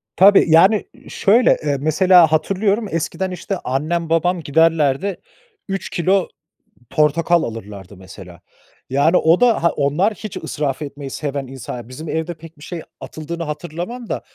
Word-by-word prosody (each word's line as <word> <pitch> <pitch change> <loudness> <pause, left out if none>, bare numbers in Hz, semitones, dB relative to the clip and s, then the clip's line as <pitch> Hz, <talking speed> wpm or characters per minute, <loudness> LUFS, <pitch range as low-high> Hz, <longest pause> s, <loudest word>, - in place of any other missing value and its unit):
Tabii, 200 +2 +6
yani, 190 +6 +5 0.2
şöyle, 235 +5 +3
ııı, 145 -1 0
mesela 165 +2 +5
hatırlıyorum, 195 +7 0
eskiden 165 +3 -2
işte 185 +2 -4
annem 160 +6 -2
babam 170 +2 +1
giderlerdi 160 +3 +1 0.5
3 195 -2 -4
kilo 185 +2 +1 0.6
portakal 160 +3 +2
alırlardı 100 -4 -8
mesela. 95 -2 -13 0.5
Yani, 140 +6 +3
o 165 +2 +3
da 235 -7 +3
ha, 170 - +4
onlar 150 +10 0
hiç 210 -2 -8
israf 145 -1 -3
etmeyi 140 -1 -7
seven 140 -1 -4
insanlar 125 -2 -8
bizim 155 +5 -8
evde 160 +2 -2
pek 165 0 -15
bir 145 - -15
şey 170 0 -6 0.2
atıldığını 165 +2 -6
hatırlamam 175 +10 -6
da, - - -3
160 Hz, 140 wpm, -19 LUFS, 145-185 Hz, 0.6 s, Tabii